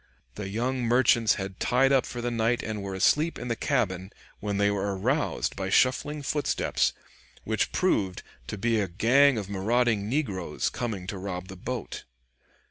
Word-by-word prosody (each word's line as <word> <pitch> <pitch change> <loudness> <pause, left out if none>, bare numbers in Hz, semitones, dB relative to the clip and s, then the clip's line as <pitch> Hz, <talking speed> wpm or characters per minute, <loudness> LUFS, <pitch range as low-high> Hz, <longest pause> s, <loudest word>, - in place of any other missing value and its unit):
The 100 -2 -6
young 125 +5 -1
merchants 120 -1 +4
had 95 -1 -6
tied 135 +2 +3
up 135 -2 +3
for 120 - -5
the 120 0 -2
night 115 +1 +1
and 110 -2 -4
were 100 -1 -5
asleep 150 - +2
in 125 - -6
the 115 - 0
cabin, 95 -7 -1 0.3
when 100 -1 -2
they 100 0 +3
were 100 -1 -1
aroused 135 +10 0
by 95 -1 -3
shuffling 145 +7 +2
footsteps, 145 +1 0 0.5
which 110 0 0
proved 100 - 0 0.2
to - - -5
be 115 +1 +1
a 100 - -1
gang 120 +9 +4
of 100 -3 -3
marauding 105 +1 +1
negroes, 100 - -1
coming 110 -7 -4
to 95 +1 -5
rob 90 -1 -5
the 95 - -8
boat. 90 - -5
110 Hz, 170 wpm, -27 LUFS, 95-125 Hz, 0.5 s, merchants